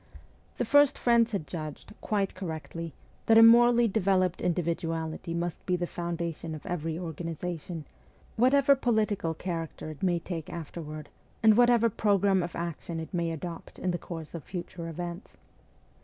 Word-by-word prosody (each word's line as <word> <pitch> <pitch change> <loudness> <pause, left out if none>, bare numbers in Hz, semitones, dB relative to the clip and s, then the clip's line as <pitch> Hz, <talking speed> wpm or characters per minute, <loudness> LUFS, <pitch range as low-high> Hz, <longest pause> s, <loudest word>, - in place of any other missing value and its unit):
The - - 0
few 290 0 +7
friends 235 -3 +2
had 195 -8 -2
judged, 155 +2 -7
quite 200 -2 0
correctly, 165 -3 -6 0.3
that 225 - +7
a 225 - +10
morally 240 +1 +7
developed 190 -4 +1
individuality 165 -1 -2
must 170 0 -3
be 180 - +2
the 175 0 -1
foundation 170 -2 -4
of 155 - -10
every 165 -2 -3
organization, 165 -1 -5 0.5
whatever 275 +4 +5
political 215 -9 0
character 165 -3 -5
it 150 - -12
may 180 -2 +2
take 165 -2 -5
afterward 155 -2 -7 0.3
and 220 -1 +7
whatever 240 -1 +5
programme 200 -3 +2
of 175 0 -5
action 170 0 -4
it 160 +4 -7
may 170 -2 0
adopt 165 +1 -7
in 185 - -1
the 175 - -2
course 165 -3 -8
of 165 -4 -6
future 175 0 -6
events. 175 +3 -6
175 Hz, 150 wpm, -29 LUFS, 165-205 Hz, 0.5 s, a